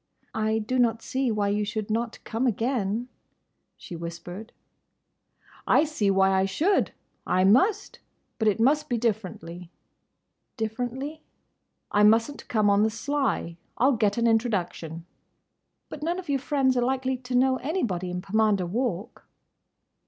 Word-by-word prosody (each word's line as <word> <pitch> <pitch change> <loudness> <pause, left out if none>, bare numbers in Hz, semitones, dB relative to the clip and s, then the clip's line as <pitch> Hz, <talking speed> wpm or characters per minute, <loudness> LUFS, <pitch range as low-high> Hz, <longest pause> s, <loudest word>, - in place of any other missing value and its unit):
"I 220 0 0
do 225 +4 -1
not 230 -2 +2
see 265 -2 -1
why 210 -2 0
you 210 +1 0
should 215 0 -3
not 230 +1 -1
come 235 +3 -1
again," 230 -1 -1 0.7
she 175 - -9
whispered. 170 +6 -7 1.2
"I - - +5
see 295 -10 0
why 195 0 +4
I 190 0 +3
should! 325 - +1 0.4
I 185 - +2
must!—But 250 - 0
it 210 +1 +2
must 300 +6 +2
be 240 - +1
differently." 180 -6 -3 0.9
"Differently—?" 250 +7 -4 0.7
"I 205 - +3
mustn't 225 +7 +3
come 215 -3 +2
on 200 0 +4
the 220 - +3
sly. 245 -7 -2 0.2
I'll 260 +4 +4
get 215 -4 +1
an 235 - +1
introduction." 190 -8 -1 0.8
"But 300 - -9
none 340 +3 -1
of 365 -4 -8
your 275 -1 +1
friends 265 -1 +1
are 245 - +2
likely 260 +1 0
to 250 0 -5
know 260 +1 +3
anybody 240 - -2
in 180 0 -4
Pomander 205 -1 +2
Walk!" 225 +2 -3
225 Hz, 140 wpm, -26 LUFS, 200-260 Hz, 1.2 s, I